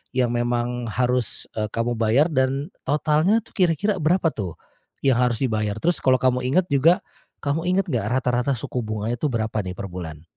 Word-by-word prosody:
yang 125 -2 +2
memang 120 0 -1
harus, 125 0 -1
eee, 105 -1 -1
kamu 115 +2 -1
bayar 115 +8 +4
dan 135 +5 0
totalnya 155 +8 +3
tuh - - -21
kira-kira 185 +1 +1
berapa 170 +2 +3
tuh, 95 -6 -5 0.5
yang 125 -2 +4
harus 120 -2 +2
dibayar? 110 -3 0
Terus 170 +5 +1
kalau 130 -1 +5
kamu 125 -1 +2
inget 175 +7 +3
juga, 160 +6 +5 0.5
kamu 160 +5 -1
inget 190 +1 +2
nggak 115 -5 0
rata-rata 125 +1 0
suku 120 +2 -4
bunganya 110 +2 -2
tuh 150 - +1
berapa 110 -1 -1
nih 90 - -5
per 100 +1 -5
bulan? 80 -4 -7
125 Hz, 180 wpm, -23 LUFS, 110-150 Hz, 0.5 s, kalau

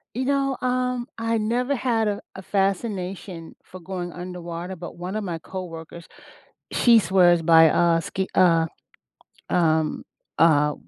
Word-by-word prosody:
You 255 +2 -1
know, 275 -1 0
um, 250 -1 -1
I 225 0 0
never 240 +5 0
had 230 -4 0
a 205 - -3
a 190 - -7
fascination 195 -3 -3
for 185 - -12
going 180 0 -6
underwater, 175 0 -7
but 175 0 -9
one 180 +3 -5
of 215 - -2
my 170 -4 -4
coworkers, 170 -2 -8 0.7
she 235 -2 +5
swears 175 -3 +4
by, 160 -1 +6
uh, 170 0 +3
ski 190 +3 -3
uh, 165 -3 +4 0.8
um 160 -2 +1 0.3
uh, 150 -2 +4
185 Hz, 140 wpm, -23 LUFS, 170-225 Hz, 0.8 s, by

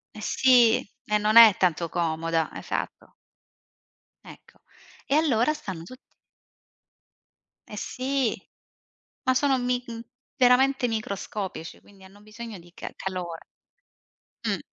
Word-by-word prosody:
Eh 215 - -9
sì, 240 0 +4 0.3
e 210 -2 +1
non 210 +1 +1
è 225 -4 +10
tanto 170 -2 +1
comoda, 165 -1 -1
esatto. - - -5 1.1
Ecco, - - -16 0.5
e 280 - 0
allora 295 -3 +2
stanno 190 - -7
tutti 255 +9 -15 1.5
Eh 210 - -9
sì, 260 -1 -1 0.9
ma 260 - +2
sono, 270 0 +2
mi 245 0 -1
mhmm, 230 -1 -7 0.4
veramente 255 +1 +4
microscopici, 200 -5 -5
quindi 195 -2 -19
hanno 195 +2 -17
bisogno 215 0 -9
di 175 0 -17
ca - - -8
calore. 180 -3 -5 1.0
Mh. - - 0
215 Hz, 115 wpm, -25 LUFS, 185-250 Hz, 1.5 s, è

